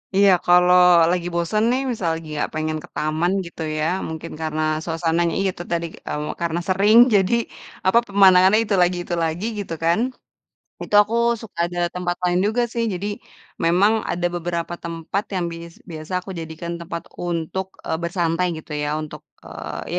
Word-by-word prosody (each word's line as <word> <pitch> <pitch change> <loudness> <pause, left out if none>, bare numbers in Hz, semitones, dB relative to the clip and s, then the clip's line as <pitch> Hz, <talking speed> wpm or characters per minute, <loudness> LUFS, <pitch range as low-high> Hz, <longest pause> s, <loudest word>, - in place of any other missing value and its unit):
Iya, 200 0 +6
kalau 180 0 +5 0.4
lagi 175 -1 -1
bosen 170 +6 0
nih 260 +2 +1
misal 195 -7 -3
lagi 160 -1 -10
gak - - -1
pengen 155 0 -1
ke - - -11
taman 155 +4 0
gitu 170 - -9 0.2
ya, 155 - 0 0.2
mungkin 160 +1 -7
karena 155 0 -2 0.2
suasananya 165 0 0
ya - - +1
itu - - -9
tadi, 170 0 0 0.2
eee, 150 0 -3
karena 170 0 -1
sering 205 +4 +4 0.2
jadi, 195 +3 +3 0.5
apa, 190 +5 +4
pemandangannya 195 +1 +6
itu 205 - -1
lagi 180 0 +2
itu 175 - -4
lagi, 165 +6 -2
gitu 185 -4 -5
kan. 170 +5 +3 0.8
Itu - - -5
aku 220 +3 -5 0.3
suka 205 -6 -8
nyari 175 0 -1
tempat 175 -1 -1
lain 180 0 +2
juga 235 +3 +1
sih, 235 -1 -1
jadi 195 +3 -4 0.6
memang 185 +6 +4 0.2
ada 175 0 -1
beberapa 170 0 -3
tempat 170 +4 -3
yang 180 -2 0
bis 170 0 -9 0.2
biasa 155 +2 -8
aku 195 - -9
jadikan 165 +1 -6
tempat 170 0 -5 0.2
untuk, 175 +2 -3 0.2
eee, 160 - 0
bersantai 170 0 0
gitu 155 - -14
ya 145 - -1
untuk, 155 - -9 0.2
eee, - - -6
175 Hz, 170 wpm, -22 LUFS, 165-190 Hz, 0.8 s, Iya